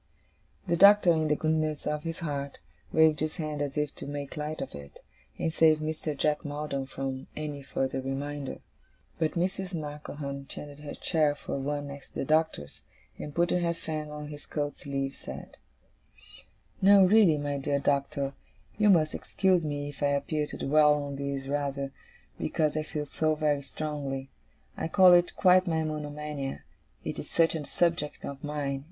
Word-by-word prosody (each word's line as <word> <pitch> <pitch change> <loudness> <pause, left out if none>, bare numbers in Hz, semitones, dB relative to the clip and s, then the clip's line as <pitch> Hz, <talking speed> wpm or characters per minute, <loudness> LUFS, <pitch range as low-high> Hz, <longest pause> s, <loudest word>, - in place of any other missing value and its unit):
The 170 -3 +1
Doctor, 200 0 +8
in 160 -1 +1
the 150 - +3
goodness 155 -1 0
of 150 0 -1
his 165 +1 -5
heart, 140 -3 -3 0.3
waved 160 -1 +5
his 155 0 -1
hand 150 -2 -3
as 145 0 -2
if 150 -1 0
to - - -6
make 145 +1 -5
light 150 0 -4
of 135 - -5
it, 70 -1 -10 0.4
and 160 - -1
save 160 -1 +5
Mr. 155 -1 -3
Jack 150 +1 +1
Maldon 145 -2 -3
from 135 -1 -4
any 150 -2 -4
further 135 0 -2
reminder. 140 +1 -4 0.6
But 160 -2 +1
Mrs. 185 +1 -1
Markleham 145 -2 -6
changed 145 0 -8
her 145 -1 -7
chair 155 -4 +1
for 140 - -4
one 145 +1 -2
next 140 -1 -11
the - - -2
Doctor's, 155 - 0 0.4
and 145 - -6
putting 175 +1 +2
her 170 -1 0
fan 155 -2 -4
on 150 0 -7
his 145 -1 -9
coat 145 -1 -2
sleeve, 135 -1 -3
said: - - -9 1.2
'No, 195 0 +8
really, 190 -5 +6
my 145 -1 -2
dear 140 +1 0
Doctor, 140 0 0 0.5
you 210 -1 +5
must 160 -5 +4
excuse 185 -5 +1
me 145 -1 -3
if 145 - -12
I 145 - +3
appear 150 +2 0
to - - -6
dwell 150 +1 +5
on 140 -1 -4
this 140 -1 -3
rather, 140 -1 -2 0.5
because 155 -1 0
I 155 - +1
feel 150 -1 -4
so 155 +2 0
very 150 -2 +1
strongly. 140 -2 -4 0.4
I - - -2
call 185 +1 +7
it 175 0 +4
quite 185 0 +5
my 160 -1 +1
monomania, 150 -2 -4 0.4
it - - -4
is - - -6
such 165 -1 +4
a 160 -2 -3
subject 170 -4 0
of 140 -1 -7
mine. 145 -2 -2
150 Hz, 170 wpm, -29 LUFS, 140-160 Hz, 1.2 s, Doctor